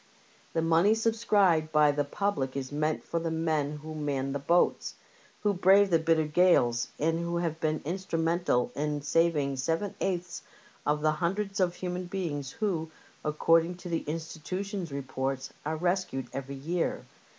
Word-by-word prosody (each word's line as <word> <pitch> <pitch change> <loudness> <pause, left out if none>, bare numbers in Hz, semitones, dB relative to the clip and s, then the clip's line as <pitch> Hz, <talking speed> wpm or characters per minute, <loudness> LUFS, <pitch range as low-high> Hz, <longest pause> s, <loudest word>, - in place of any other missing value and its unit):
The 165 - +1
money 165 +6 +4
sub 225 0 +1
scribed 195 -8 +3
by 150 -1 +5
the 145 0 0
public 140 -4 -2
is 130 0 -4
meant 155 +1 -1
for 170 - -2
the 165 0 -2
men 155 -2 -1
who 155 0 -6
man 140 -3 -2
the 140 - -2
boats, 170 +6 +1 0.5
who 205 -1 +2
brave 195 +1 +5
the 165 - +5
bitter 160 -1 +2
gales, 150 -8 +3
and 165 +2 +1
who 170 0 -2
have 165 -2 -2
been 155 -1 -1
instrumental 165 -5 0
in 150 0 -2
saving 150 -3 +2
seven 165 +8 -1
eighths 180 -2 -2 0.5
of 150 0 +2
the 155 0 +3
hundreds 195 +5 -2
of 180 -2 +2
human 180 0 -4
beings 165 -7 -3
who, 175 -5 -2 0.3
according 165 +3 +3
to 180 0 -9
the 165 -1 0
Institution's 170 +4 -4
reports, 135 -1 -3
are 160 +1 -1
rescued 175 -6 -1
every 135 0 -5
year. 165 +6 -2
165 Hz, 160 wpm, -29 LUFS, 150-180 Hz, 0.5 s, by